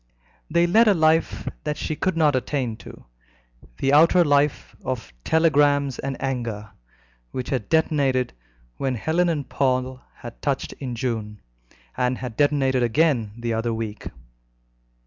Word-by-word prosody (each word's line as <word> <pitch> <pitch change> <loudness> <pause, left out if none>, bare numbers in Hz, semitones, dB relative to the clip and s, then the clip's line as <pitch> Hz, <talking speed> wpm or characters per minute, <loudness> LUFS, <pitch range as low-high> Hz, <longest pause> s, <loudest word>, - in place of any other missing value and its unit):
They 170 - +3
led 220 +7 +4
a 205 - +5
life 160 0 +2 0.2
that 150 - -2
she 155 - -3
could 185 +1 -1
not 150 -4 +3
attain 130 -3 -2
to - - -13 0.7
the 135 - +1
outer 170 +4 +6
life 145 0 +1
of 120 - -4
"telegrams 145 - +2
and 135 -1 -4
anger," 115 -6 -4 0.6
which 125 - -5
had 130 -7 -2
detonated 140 -6 +1 0.4
when 135 -2 -1
Helen 165 +8 +1
and 145 -5 -2
Paul 130 -1 -1
had - - -11
touched - - -2
in 125 -3 -4
June, 110 -3 -3 0.6
and 125 0 0
had 125 -3 -6
detonated 135 -2 +2
again 120 -3 +1
the 120 -1 -2
other 115 +1 -1
week. 110 -2 -5
135 Hz, 140 wpm, -23 LUFS, 120-155 Hz, 0.7 s, outer